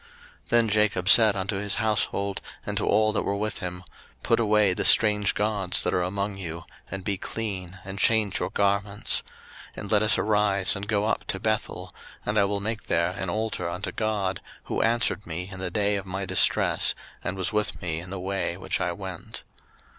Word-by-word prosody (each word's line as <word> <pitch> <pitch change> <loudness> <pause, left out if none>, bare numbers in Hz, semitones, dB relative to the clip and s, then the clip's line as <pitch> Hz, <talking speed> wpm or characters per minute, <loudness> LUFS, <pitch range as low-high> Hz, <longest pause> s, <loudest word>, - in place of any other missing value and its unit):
01:035:002 470 - -24 0.4
Then 115 -1 +3
Jacob 105 -3 +2
said 110 -3 +7
unto 95 +1 -2
his 100 0 -1
household, 105 -2 -1 0.2
and - - -4
to - - -1
all 110 +1 +3
that - - +1
were 100 - -2
with 105 +1 -3
him, 90 -1 -6 0.4
Put 115 - +2
away 105 -3 +3
the - - -2
strange 105 -2 +5
gods 105 -3 0
that - - -1
are 90 - +1
among 100 +2 -2
you, 85 -2 -6 0.3
and 95 0 -6
be 100 0 -1
clean, 95 -4 -5
and 95 +1 -6
change 110 -1 +3
your - - -2
garments: 100 +1 +1 0.6
01:035:003 - - -5
And 100 - -7
let 105 -1 +4
us 110 -1 +4
arise, 105 -2 +2
and 100 +1 -5
go 105 -1 0
up 110 - -1
to 95 - -2
Bethel; 110 +1 -2 0.3
and 105 +1 +1
I 100 - +4
will 100 0 -1
make 110 +1 -4
there 85 +1 +1
an 95 0 -5
altar 105 -3 -2
unto 90 +2 -4
God, 105 -3 -2 0.2
who - - -2
answered 115 -2 +1
me 90 +2 -4
in 95 - -8
the 95 -1 -1
day 100 +2 +1
of 95 -1 -6
my 95 +1 -4
distress, - - +4 0.3
and 95 - -4
was 95 0 0
with 105 0 -1
me 80 -4 -2
in 90 +1 -9
the 95 0 -5
way 95 -2 -2
which 95 - -2
I 90 - 0
went. 95 -1 -7
100 Hz, 205 wpm, -25 LUFS, 95-105 Hz, 0.6 s, said